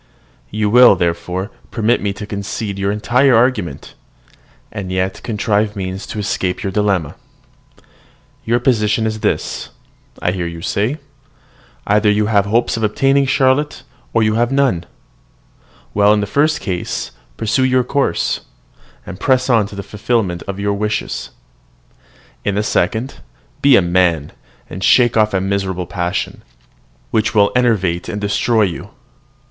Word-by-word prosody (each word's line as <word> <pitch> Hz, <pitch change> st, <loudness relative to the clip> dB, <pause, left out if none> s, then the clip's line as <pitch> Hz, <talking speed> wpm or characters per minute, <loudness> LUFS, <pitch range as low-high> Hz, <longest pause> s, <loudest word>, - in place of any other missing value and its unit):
You 105 Hz, 0 st, -1 dB
will, 125 Hz, +4 st, +7 dB
therefore, 90 Hz, +3 st, -2 dB, 0.2 s
permit 115 Hz, +1 st, +1 dB
me 100 Hz, -, -1 dB
to 100 Hz, +1 st, -7 dB
concede 100 Hz, 0 st, -4 dB
your 100 Hz, +1 st, 0 dB
entire 125 Hz, +5 st, +3 dB
argument, 115 Hz, -, 0 dB, 0.8 s
and 100 Hz, -4 st, -5 dB
yet 95 Hz, 0 st, -2 dB
contrive 105 Hz, -1 st, 0 dB
means 95 Hz, 0 st, -5 dB
to -, -, -7 dB
escape 95 Hz, -3 st, -2 dB
your 95 Hz, -, -2 dB
dilemma. 95 Hz, -7 st, 0 dB, 1.3 s
Your 120 Hz, +2 st, +1 dB
position 110 Hz, -3 st, +1 dB
is 110 Hz, 0 st, -2 dB
this, -, -, -2 dB, 0.5 s
I 90 Hz, -, 0 dB
hear 90 Hz, -2 st, -3 dB
you 85 Hz, 0 st, -8 dB
say: 110 Hz, +9 st, -1 dB, 0.9 s
"Either 105 Hz, +1 st, +3 dB
you 105 Hz, +1 st, +2 dB
have 100 Hz, -2 st, +2 dB
hopes 115 Hz, +3 st, +1 dB
of -, -, -3 dB
obtaining 135 Hz, +6 st, +2 dB
Charlotte, 135 Hz, +2 st, +1 dB, 0.3 s
or 115 Hz, -, +2 dB
you 110 Hz, 0 st, +2 dB
have 120 Hz, +3 st, +1 dB
none. 135 Hz, -11 st, +1 dB, 1.1 s
Well, 105 Hz, 0 st, +4 dB
in 105 Hz, -, +2 dB
the 100 Hz, -, -1 dB
first 150 Hz, +8 st, +1 dB
case, 90 Hz, -4 st, -3 dB, 0.3 s
pursue 110 Hz, +4 st, +1 dB
your 130 Hz, -1 st, +3 dB
course, 140 Hz, +3 st, 0 dB, 0.7 s
and 90 Hz, -, -8 dB
press 130 Hz, +1 st, +2 dB
on 110 Hz, -4 st, +3 dB
to 100 Hz, -, -11 dB
the 100 Hz, -, -5 dB
fulfilment 105 Hz, -5 st, -1 dB
of 100 Hz, 0 st, -5 dB
your 100 Hz, 0 st, 0 dB
wishes. 105 Hz, +1 st, -3 dB, 1.1 s
In 100 Hz, -, -1 dB
the 105 Hz, -, +1 dB
second, 115 Hz, +4 st, -1 dB, 0.4 s
be 140 Hz, -1 st, +6 dB
a -, -, +5 dB
man, 85 Hz, -4 st, +1 dB, 0.4 s
and 95 Hz, +3 st, -7 dB
shake 120 Hz, +5 st, +4 dB
off 110 Hz, -1 st, +3 dB
a -, -, +2 dB
miserable 95 Hz, -1 st, -2 dB
passion, 90 Hz, 0 st, -3 dB, 0.7 s
which 110 Hz, +1 st, 0 dB
will 100 Hz, -1 st, +4 dB
enervate 100 Hz, -9 st, +1 dB
and 105 Hz, -, -3 dB
destroy 105 Hz, +2 st, +1 dB
you." 90 Hz, -4 st, -3 dB
105 Hz, 145 wpm, -17 LUFS, 95-120 Hz, 1.3 s, will